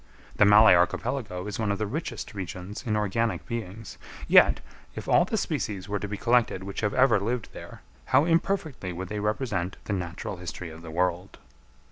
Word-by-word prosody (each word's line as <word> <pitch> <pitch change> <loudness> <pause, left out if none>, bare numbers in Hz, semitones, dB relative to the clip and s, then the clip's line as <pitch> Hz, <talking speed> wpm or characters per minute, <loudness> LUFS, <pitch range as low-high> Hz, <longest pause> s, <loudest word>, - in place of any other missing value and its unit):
The 105 - +6
Malay 105 +1 +8
Archipelago 90 +2 0
is 105 +1 -5
one 105 -2 0
of 100 - -1
the 110 - -1
richest 140 +2 -5
regions 95 +1 -6
in 105 - +1
organic 105 -2 -1
beings; 115 -2 -6 0.3
yet - - +6 0.4
if - - -7
all - - +5
the - - -2
species 100 -2 -3
were 105 0 -2
to 105 - -4
be 105 +1 -5
collected 115 -5 +2
which 100 0 -5
have 105 -2 -1
ever 130 -5 +5
lived 115 +3 -3
there, - - -11 0.2
how 135 +3 +4
imperfectly 165 - 0
would 90 +1 -6
they 105 - -3
represent 105 -4 -2
the 105 - -3
natural 90 0 -4
history 85 -1 -7
of 80 +1 -11
the 85 - -9
world! 90 +2 -1
105 Hz, 185 wpm, -27 LUFS, 90-115 Hz, 0.4 s, Malay